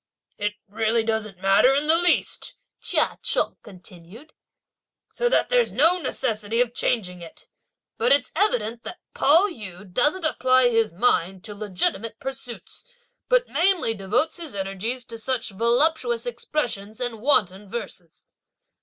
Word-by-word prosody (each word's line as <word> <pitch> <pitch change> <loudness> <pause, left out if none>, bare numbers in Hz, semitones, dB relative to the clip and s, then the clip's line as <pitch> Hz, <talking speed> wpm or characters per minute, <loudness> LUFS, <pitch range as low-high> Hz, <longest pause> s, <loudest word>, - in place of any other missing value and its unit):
"It 205 0 -2 0.5
doesn't 220 -1 -1
really 180 - -26
matter 205 +7 +5
in 290 +2 0
the 315 +2 +4
least," 350 +1 +1 0.2
Chia - - +1
Cheng - - 0
continued; 190 - -14 0.8
"so 485 - 0
that - - +2
there's - - +2
no 335 +6 +3
necessity 220 -7 -2
of 245 -1 +1
changing 180 -9 0
it; 165 - -11 0.5
but 460 - +2
it's 285 - +3
evident 235 - 0
that 355 - -8 0.2
Pao 330 +8 +4
yü 205 - -10
doesn't 300 - +1
apply 255 -4 +3
his 225 -2 +2
mind 185 -2 0
to 210 - -7
legitimate 205 +1 -2
pursuits, 265 -3 -7 0.5
but - - +3
mainly 350 -9 +2
devotes 215 - -1
his 325 -9 -7
energies 200 +6 -3
to 230 -2 -7
such 245 -1 -2
voluptuous 240 +2 +1
expressions 235 -4 -3
and 240 -3 -4
wanton 205 -7 +1
verses!" 190 -7 -7
235 Hz, 135 wpm, -24 LUFS, 205-290 Hz, 0.8 s, matter